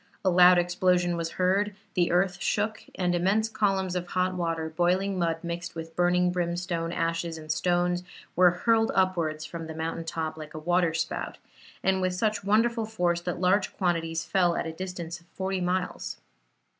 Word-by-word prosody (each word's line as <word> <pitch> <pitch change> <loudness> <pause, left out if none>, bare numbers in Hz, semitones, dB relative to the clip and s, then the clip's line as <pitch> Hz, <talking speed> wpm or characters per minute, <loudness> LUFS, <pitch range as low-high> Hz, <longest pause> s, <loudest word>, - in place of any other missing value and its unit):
A 185 - +4
loud 180 0 +7
explosion 175 0 +2
was 165 -1 -3
heard; 195 +3 +1 0.2
the 175 -1 +2
earth 180 +1 +1
shook, 215 +1 -1
and 180 -1 0
immense 195 +5 +2
columns 195 -4 0
of 180 -1 -2
hot 185 +1 0
water, 165 -3 -2
boiling 180 +4 +1
mud 165 -1 -1
mixed 170 0 -5
with 165 0 -7
burning 180 0 +3
brimstone, 175 -1 -2
ashes 165 0 -2
and 155 -1 -5
stones, 175 +2 +1 0.3
were 180 0 +7
hurled 225 +5 +2
upwards 170 -5 +1
from 165 -1 -7
the 160 - -7
mountain 165 +1 -3
top 160 -1 -4
like 155 -1 -9
a - - -4
waterspout, 170 0 0 0.5
and 190 0 +2
with 185 -1 0
such 210 +1 0
wonderful 225 +2 +2
force 175 -6 0
that 175 0 -3
large 190 +2 +1
quantities 165 -3 0
fell 175 -3 +2
at - - -2
a 160 - -4
distance 175 -1 -6
of 170 - -26
forty 190 0 -2
miles. 180 - -2
180 Hz, 170 wpm, -27 LUFS, 165-185 Hz, 0.5 s, loud